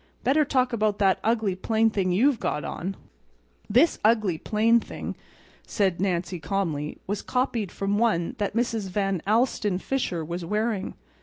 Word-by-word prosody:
Better 290 Hz, +4 st, +4 dB
talk 255 Hz, -3 st, +1 dB
about 215 Hz, -2 st, +1 dB
that 195 Hz, -2 st, +3 dB
ugly, 220 Hz, -4 st, +1 dB
plain 220 Hz, +4 st, +1 dB
thing 190 Hz, -3 st, 0 dB
you've 240 Hz, +7 st, +3 dB
got 150 Hz, -, -2 dB
on." 190 Hz, +4 st, -4 dB, 0.7 s
"This 255 Hz, +11 st, +4 dB
ugly, 215 Hz, -7 st, +2 dB
plain 225 Hz, +5 st, +3 dB
thing," -, -, -6 dB, 0.5 s
said 190 Hz, -5 st, 0 dB
Nancy, 180 Hz, -2 st, -1 dB
calmly, 160 Hz, -3 st, -2 dB
"was 205 Hz, +1 st, -3 dB
copied 240 Hz, -6 st, -1 dB
from 200 Hz, +1 st, -1 dB
one 215 Hz, -5 st, +1 dB
that 205 Hz, 0 st, -2 dB
Mrs. 230 Hz, -4 st, -1 dB
Van 195 Hz, -2 st, -1 dB
Alstyne 215 Hz, -3 st, +2 dB
Fisher 185 Hz, -8 st, -2 dB
was 170 Hz, +2 st, -4 dB
wearing. 210 Hz, +2 st, -1 dB
205 Hz, 150 wpm, -26 LUFS, 185-230 Hz, 0.7 s, Better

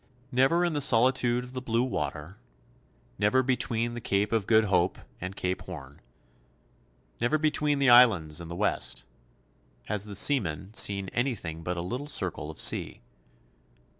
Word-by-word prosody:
Never 135 Hz, +8 st, +3 dB
in 170 Hz, -, -1 dB
the 145 Hz, -, -1 dB
solitude 125 Hz, -1 st, +3 dB
of 125 Hz, +1 st, -11 dB
the 130 Hz, -, -4 dB
blue 115 Hz, -1 st, 0 dB
water, 80 Hz, -, -4 dB, 0.8 s
never 105 Hz, +6 st, +3 dB
between 120 Hz, -2 st, -1 dB
the 120 Hz, -, -6 dB
Cape 100 Hz, -2 st, 0 dB
of 110 Hz, -3 st, 0 dB
Good 110 Hz, -1 st, +5 dB
Hope 90 Hz, -3 st, +1 dB, 0.2 s
and 90 Hz, +2 st, -6 dB
Cape 90 Hz, -1 st, -3 dB
Horn, 75 Hz, -7 st, -10 dB, 1.2 s
never 120 Hz, +6 st, +1 dB
between 150 Hz, -1 st, 0 dB
the 135 Hz, -2 st, +4 dB
Islands 95 Hz, -11 st, +5 dB
and 85 Hz, -, -9 dB
the 85 Hz, -, -6 dB
West, -, -, -1 dB, 0.8 s
has 105 Hz, -1 st, -3 dB
the 100 Hz, -1 st, -8 dB
seaman 95 Hz, -, +1 dB
seen 100 Hz, -3 st, +2 dB
anything 105 Hz, -11 st, -3 dB
but 90 Hz, +1 st, -4 dB
a 85 Hz, -, -3 dB
little 125 Hz, +10 st, -5 dB
circle 90 Hz, -, -3 dB
of 80 Hz, -, -10 dB
sea. -, -, 0 dB
110 Hz, 155 wpm, -28 LUFS, 90-125 Hz, 1.2 s, Good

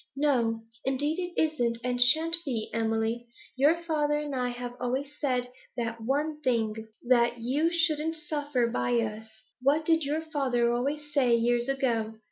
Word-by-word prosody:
'No, 240 Hz, -6 st, +1 dB, 0.2 s
indeed, 290 Hz, +5 st, 0 dB
it 355 Hz, -1 st, -3 dB
isn't, 245 Hz, -7 st, +1 dB
and 250 Hz, 0 st, +2 dB
shan't 315 Hz, +6 st, +5 dB
be, 235 Hz, -7 st, -3 dB
Emily. 225 Hz, +1 st, -1 dB, 0.3 s
Your 305 Hz, +6 st, +3 dB
father 300 Hz, -3 st, +1 dB
and 295 Hz, -1 st, -4 dB
I 250 Hz, -1 st, 0 dB
have 245 Hz, 0 st, -5 dB
always 260 Hz, +3 st, -2 dB
said 250 Hz, -3 st, -1 dB, 0.3 s
that 230 Hz, -1 st, -3 dB
one 295 Hz, +6 st, -1 dB
thing, 220 Hz, -4 st, -1 dB, 0.2 s
that 240 Hz, -1 st, +3 dB
you 275 Hz, +8 st, +1 dB
shouldn't 325 Hz, -2 st, +1 dB
suffer 290 Hz, -5 st, -1 dB
by 245 Hz, +1 st, -1 dB
us. 220 Hz, -1 st, -3 dB, 0.3 s
What 290 Hz, +4 st, +2 dB
did 325 Hz, -1 st, +3 dB
your 295 Hz, +3 st, -1 dB
father 265 Hz, -7 st, 0 dB
always 295 Hz, +4 st, -3 dB
say 250 Hz, -5 st, +4 dB
years 240 Hz, +2 st, +1 dB
ago? 235 Hz, -5 st, 0 dB
260 Hz, 155 wpm, -28 LUFS, 235-300 Hz, 0.3 s, shan't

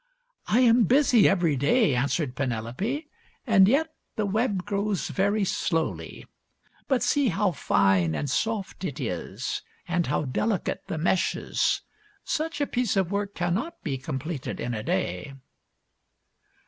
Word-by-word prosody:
" -, -, -48 dB
I 235 Hz, +4 st, +3 dB
am 235 Hz, -2 st, +5 dB
busy 250 Hz, -3 st, +5 dB
every 175 Hz, -6 st, +2 dB
day," 145 Hz, -, +3 dB
answered 135 Hz, +2 st, 0 dB
Penelope, 135 Hz, -, -2 dB, 0.2 s
" -, -, -36 dB
and 200 Hz, -6 st, +6 dB
yet 310 Hz, +7 st, +2 dB, 0.2 s
the 215 Hz, -, 0 dB
web 200 Hz, -2 st, 0 dB
grows 205 Hz, -2 st, -1 dB
very 200 Hz, +2 st, +1 dB
slowly. 165 Hz, -3 st, -2 dB, 0.6 s
But 265 Hz, -3 st, +2 dB
see 285 Hz, -2 st, +2 dB
how 195 Hz, 0 st, +1 dB
fine 95 Hz, -, +2 dB
and 145 Hz, -, -2 dB
soft 210 Hz, -, -2 dB
it -, -, -4 dB
is, -, -, -3 dB, 0.3 s
and 175 Hz, -1 st, 0 dB
how 150 Hz, +3 st, 0 dB
delicate 190 Hz, -, -1 dB
the -, -, -3 dB
meshes. 175 Hz, +3 st, +1 dB, 0.4 s
Such 315 Hz, -1 st, -2 dB
a 290 Hz, -, +2 dB
piece 240 Hz, -7 st, 0 dB
of 190 Hz, -2 st, +1 dB
work 200 Hz, 0 st, -2 dB
cannot 195 Hz, -, -2 dB
be 135 Hz, -5 st, -2 dB
completed 135 Hz, +3 st, -4 dB
in 120 Hz, -, -3 dB
a 110 Hz, -, -3 dB
day." 95 Hz, +5 st, -2 dB
190 Hz, 145 wpm, -26 LUFS, 140-225 Hz, 0.6 s, and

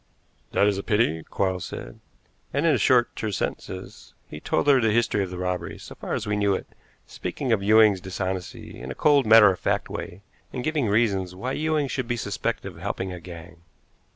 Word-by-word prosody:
"That -, -, +4 dB
is 100 Hz, -1 st, +1 dB
a -, -, -5 dB
pity," 105 Hz, -8 st, +1 dB
Quarles 95 Hz, +1 st, -2 dB
said, -, -, -8 dB, 0.5 s
and 140 Hz, +4 st, 0 dB
in 160 Hz, -, +4 dB
short, 125 Hz, -2 st, +3 dB
terse 105 Hz, -3 st, -3 dB
sentences 95 Hz, +2 st, -6 dB
he 75 Hz, -, -9 dB
told -, -, 0 dB
her 140 Hz, -3 st, +5 dB
the 110 Hz, -, +3 dB
history 105 Hz, -2 st, +2 dB
of 95 Hz, -, -5 dB
the 90 Hz, -, -7 dB
robbery, 90 Hz, 0 st, -3 dB
so -, -, -10 dB
far -, -, -4 dB
as -, -, -3 dB
we 105 Hz, 0 st, -1 dB
knew 100 Hz, -1 st, +2 dB
it, -, -, -5 dB, 0.4 s
speaking 120 Hz, +8 st, -4 dB
of 110 Hz, -3 st, +2 dB
Ewing's 105 Hz, -2 st, +5 dB
dishonesty 95 Hz, -1 st, -5 dB
in 65 Hz, -, -7 dB
a -, -, -5 dB
cold, 145 Hz, -5 st, +3 dB
matter 110 Hz, -2 st, +8 dB
of 90 Hz, -, -5 dB
fact -, -, -1 dB
way, 95 Hz, +3 st, -7 dB, 0.3 s
and 125 Hz, -, -4 dB
giving 155 Hz, -5 st, 0 dB
reasons 100 Hz, -4 st, +1 dB
why 125 Hz, +8 st, -4 dB
Ewing 155 Hz, 0 st, 0 dB
should 130 Hz, -2 st, -3 dB
be 120 Hz, 0 st, -1 dB
suspected 100 Hz, -3 st, -3 dB
of -, -, -15 dB
helping 95 Hz, -1 st, -3 dB
a 90 Hz, -, -7 dB
gang. 85 Hz, -1 st, -11 dB
100 Hz, 205 wpm, -25 LUFS, 90-120 Hz, 0.5 s, matter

